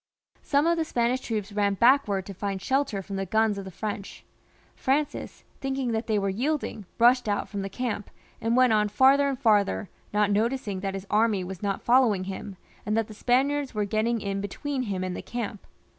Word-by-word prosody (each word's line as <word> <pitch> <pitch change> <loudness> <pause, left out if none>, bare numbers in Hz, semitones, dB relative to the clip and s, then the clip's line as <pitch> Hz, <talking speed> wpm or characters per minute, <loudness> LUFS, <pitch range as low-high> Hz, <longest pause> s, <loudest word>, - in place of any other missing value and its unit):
Some 285 +1 +2
of 335 0 +2
the - - +2
Spanish 250 -3 0
troops 215 -4 -3
ran 200 -1 +1
backwards 235 -5 +3
to 200 - -7
find 195 +1 -3
shelter 260 -3 0
from 195 +1 -5
the 195 - -2
guns 220 +1 +2
of 195 - -7
the - - -6
French; 205 +2 -6 0.5
Francis, 290 +2 -1 0.2
thinking 270 -2 -2
that 225 +1 -2
they 215 -2 +1
were 200 -1 0
yielding, 235 - -2
rushed 245 0 +4
out 205 - 0
from 200 -2 -4
the 195 - -4
camp, 230 -3 -3 0.3
and 230 +2 +1
went 255 -3 +5
on 210 -1 +3
farther 270 +6 +5
and 270 - -2
farther, 205 - +2 0.2
not 210 0 +2
noticing 215 -2 0
that 195 0 -3
his 195 0 -6
army 210 -3 +2
was 185 0 -7
not 200 -2 -2
following 235 -6 +4
him, 195 +1 -6 0.3
and 210 +2 -1
that 225 -1 0
the - - -8
Spaniards 265 +4 +1
were 210 -1 +1
getting 220 +3 0
in 195 0 -2
between 265 +7 -3
him 195 -6 -2
and 185 -1 -3
the - - -5
camp. 225 -4 -5
215 Hz, 205 wpm, -26 LUFS, 200-255 Hz, 0.5 s, went